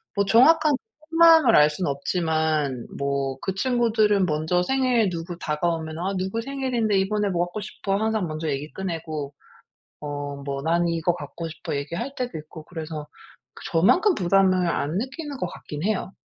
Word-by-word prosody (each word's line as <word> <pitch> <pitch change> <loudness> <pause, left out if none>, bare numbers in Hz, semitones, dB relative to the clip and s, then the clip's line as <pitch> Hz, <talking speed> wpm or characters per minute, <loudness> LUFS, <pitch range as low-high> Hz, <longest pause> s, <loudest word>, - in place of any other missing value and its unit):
뭐 200 - +2
정확한 295 +9 +5 0.4
속마음을 325 -7 +7
알 150 0 +7
수는 150 +1 -2
없지만 155 -3 -1
뭐 140 -1 -1
그 190 - -2
친구들은 220 -4 +2
먼저 160 +2 0
생일 250 -3 +2
누구 170 0 -5
다가오면 160 0 -2
"아 190 +3 -1
누구 190 +5 -2
생일인데 245 -5 0
이번에 205 +1 0
뭐 175 -1 +1
갖고 180 +4 -6
싶어?" 200 -1 -3
항상 220 -3 0
먼저 155 0 -4
얘기 145 +1 -3
꺼내고 160 -6 -4 0.7
어 145 -1 -5
뭐 140 -1 -4
"난 170 +2 +1
이거 170 +1 0
갖고 170 -1 -7
싶어." 155 -2 -5
얘기할 170 - -4
때도 245 -9 -3
있고 155 +1 -11
그래서 160 -3 -6 0.5
그 - - -12
저만큼 350 - +4
그 - - -5
부담을 185 0 +3
안 155 +1 -1
느끼는 280 +4 -5
것 180 - -1
같긴 150 +1 -8
해요. 200 -2 -1
175 Hz, 330 characters per minute, -24 LUFS, 155-220 Hz, 0.7 s, 속마음을